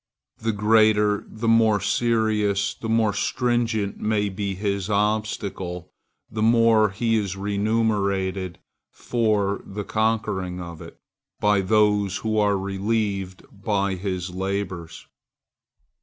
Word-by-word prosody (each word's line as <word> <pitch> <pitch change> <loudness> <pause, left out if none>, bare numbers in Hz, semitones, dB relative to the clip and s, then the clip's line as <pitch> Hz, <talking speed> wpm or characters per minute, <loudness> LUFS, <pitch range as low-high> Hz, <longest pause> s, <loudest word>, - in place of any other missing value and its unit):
The 115 - 0
greater, 105 -1 +3
the 110 +1 -5
more 110 -2 +4
serious, 110 -3 +1
the 115 - -7
more 110 -2 +2
stringent 115 -3 -1
may 105 -1 0
be 100 0 -3
this 100 0 -2
obstacle, 100 -4 -2 0.4
the 110 0 -5
more 115 -1 +4
he 115 +3 0
is 100 -3 -2
remunerated 100 -3 0 0.3
for 105 -4 0
the 105 +1 -6
conquering 105 -5 -1
of 85 -2 -8
it, - - -12 0.4
by 105 -1 +3
those 105 -1 +2
who 110 -1 -1
are 105 -1 +2
relieved 100 -1 -2
by 100 -1 -1
his 90 -1 -4
labors. 95 -3 -4
105 Hz, 110 wpm, -24 LUFS, 95-110 Hz, 0.4 s, more